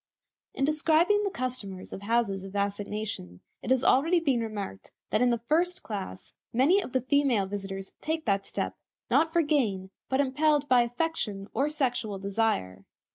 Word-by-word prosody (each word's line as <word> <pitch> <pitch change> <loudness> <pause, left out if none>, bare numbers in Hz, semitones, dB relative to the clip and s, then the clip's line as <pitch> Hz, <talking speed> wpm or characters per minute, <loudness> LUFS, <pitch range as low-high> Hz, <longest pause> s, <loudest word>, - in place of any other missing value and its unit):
In 270 - +1
describing 320 +7 +3
the 400 - 0
customers 240 - -5
of - - -7
houses 205 -3 0
of 195 +1 -9
assignation, 200 - -3 0.2
it - - -6
has 260 0 +3
already 330 +7 +4
been 275 -7 +1
remarked 205 - -5 0.2
that 215 - +2
in 250 - +4
the 235 - +2
first 340 +10 0
class 195 -3 -6 0.2
many 295 +12 +4
of 265 - -8
the 260 - +2
female 260 -5 +2
visitors 195 -1 -5
take 315 0 -2
that 195 -2 +1
step, - - -3 0.4
not 325 0 +4
for 340 0 +3
gain, 215 -11 0 0.2
but 265 - +1
impelled 290 +1 +2
by 250 -2 +5
affection 240 -6 -2
or 280 +3 +1
sexual 245 -8 -1
desire. 195 - -1
240 Hz, 165 wpm, -28 LUFS, 200-295 Hz, 0.4 s, by